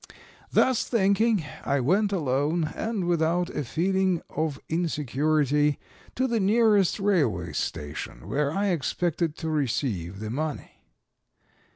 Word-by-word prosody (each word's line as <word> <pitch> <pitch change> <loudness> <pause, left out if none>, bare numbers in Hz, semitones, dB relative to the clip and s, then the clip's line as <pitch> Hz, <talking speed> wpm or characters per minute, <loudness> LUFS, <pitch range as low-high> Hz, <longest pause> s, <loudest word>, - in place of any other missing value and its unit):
Thus 260 -3 +3
thinking, 210 -3 +2 0.2
I 140 0 +1
went 195 - +2
alone, 155 -1 0
and 220 -5 -2
without 175 +1 +1
a 150 - -3
feeling 185 +5 0
of 155 -2 -2
insecurity, 150 -2 +1 0.4
to 260 - +1
the 235 -2 0
nearest 210 -1 +3
railway 145 - +1
station, 75 -4 -5
where 145 0 0
I 200 +4 0
expected 170 +1 -1
to 160 - -4
receive 115 - -1
the 110 0 -5
money. 150 +4 -4
160 Hz, 115 wpm, -26 LUFS, 140-195 Hz, 0.4 s, Thus